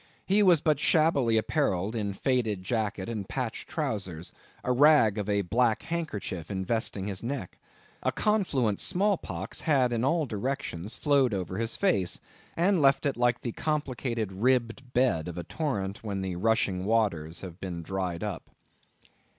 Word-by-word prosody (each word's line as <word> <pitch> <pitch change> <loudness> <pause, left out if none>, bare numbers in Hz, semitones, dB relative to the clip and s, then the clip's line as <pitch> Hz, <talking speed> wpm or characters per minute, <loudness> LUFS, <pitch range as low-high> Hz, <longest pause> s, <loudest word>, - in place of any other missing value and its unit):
He 200 +2 +3
was 180 -6 +5
but 155 -4 +2
shabbily 145 -9 +3
apparelled 110 - 0
in 100 -3 -2
faded 110 -6 0
jacket 105 -2 -2
and 105 -4 -4
patched 125 -4 -4
trowsers; 95 - -3 0.3
a 125 - 0
rag 125 -6 +5
of 105 0 -3
a 100 -1 +2
black 110 +4 +1
handkerchief 110 - -4
investing 100 0 -1
his 100 -2 -3
neck. 120 -6 -5 0.4
A - - +1
confluent 140 - +1
small 200 +3 +2
pox 95 - -6
had 130 -6 +2
in 115 0 0
all 160 +3 +2
directions 110 -5 -3
flowed 140 -7 +3
over 95 +1 -3
his 115 0 -2
face, 100 - +1 0.4
and 180 0 +3
left 135 0 +4
it 140 - +1
like 120 0 +1
the 120 - -3
complicated 125 -8 -2
ribbed 125 +4 0
bed 95 -12 +2
of 90 - -6
a 85 - -3
torrent, 100 - -3
when 100 -3 -3
the 95 -2 -3
rushing 95 -2 +1
waters 95 -8 0
have 90 -1 -9
been 90 -3 -5
dried 90 -1 -3
up. - - -5
115 Hz, 160 wpm, -28 LUFS, 95-135 Hz, 0.4 s, was